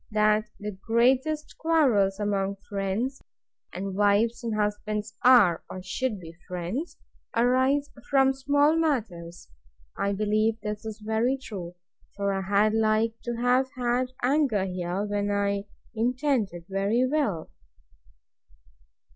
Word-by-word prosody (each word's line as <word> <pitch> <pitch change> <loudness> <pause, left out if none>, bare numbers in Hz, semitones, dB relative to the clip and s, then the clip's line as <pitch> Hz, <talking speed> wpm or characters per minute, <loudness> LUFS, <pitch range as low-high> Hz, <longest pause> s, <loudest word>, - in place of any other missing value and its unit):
That 215 0 +2
the 210 +1 -4
greatest 255 +9 0
quarrels 245 -12 +2
among 200 -1 -1
friends 205 +7 -2 0.5
(and 195 +1 -5
wives 205 +4 +2
and 230 -2 -2
husbands 210 0 -2
are, 235 -10 +6
or 185 - -7
should 210 +3 -2
be, 165 -2 -10
friends) 180 - -4 0.4
arise 260 +4 +2 0.2
from 270 -1 +4
small 285 +3 +2
matters. 205 - -2 0.5
I 200 0 -1
believe 215 +2 +1
this 210 0 -5
is 220 0 -7
very 225 +5 +1
true; 185 -9 -8 0.4
for 200 0 -1
I 195 - -1
had 205 +3 +2
like 220 0 +2
to 240 0 -2
have 250 +2 +2
had 245 +1 +1 0.2
anger 255 -7 +2
here, 180 +1 -3
when 205 0 -1
I 200 0 0 0.3
intended 235 - -1
very 200 +6 +1
well. 255 - -1
215 Hz, 120 wpm, -26 LUFS, 200-255 Hz, 0.5 s, are